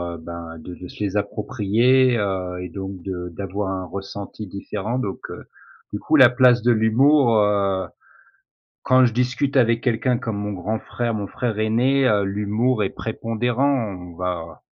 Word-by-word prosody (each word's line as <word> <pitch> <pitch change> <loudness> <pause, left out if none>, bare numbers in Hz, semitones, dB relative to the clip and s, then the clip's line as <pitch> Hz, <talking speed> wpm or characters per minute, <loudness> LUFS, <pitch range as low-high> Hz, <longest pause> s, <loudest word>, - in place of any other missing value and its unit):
heu, - - -8
ben 85 0 -8
de 90 +2 -9
se 105 - -7
les 100 0 -1
approprier, 120 +4 +2
heu, 90 -3 -2
et 90 - -6
donc 95 0 -7
de 90 -2 -5
d'avoir 100 0 -3
un 95 -1 -3
ressenti 100 +2 -7
différent 105 +5 -4
donc 100 -6 -4
heu, - - -8 0.5
du - - -4
coup - - +1
la 125 -2 +8
place 125 -1 +4
de 120 +1 +3
l'humour, 120 +2 +4
heu, 100 -3 +1 1.0
quand 130 0 +5
je 120 - +1
discute 125 +3 0
avec 115 -2 +3
quelqu'un 120 0 +1
comme 110 -3 -4
mon 105 0 -3
grand 105 +4 -3
frère. 120 -1 -3
Mon 100 -2 -3
frère 115 -4 -3
aîné, 130 +5 +2
heu, 105 -3 +3
l'humour 105 +4 0
est 95 - -2
prépondérant, 115 0 -1 0.2
on - - -18
va 90 -2 -5
105 Hz, 165 wpm, -22 LUFS, 95-120 Hz, 1.0 s, la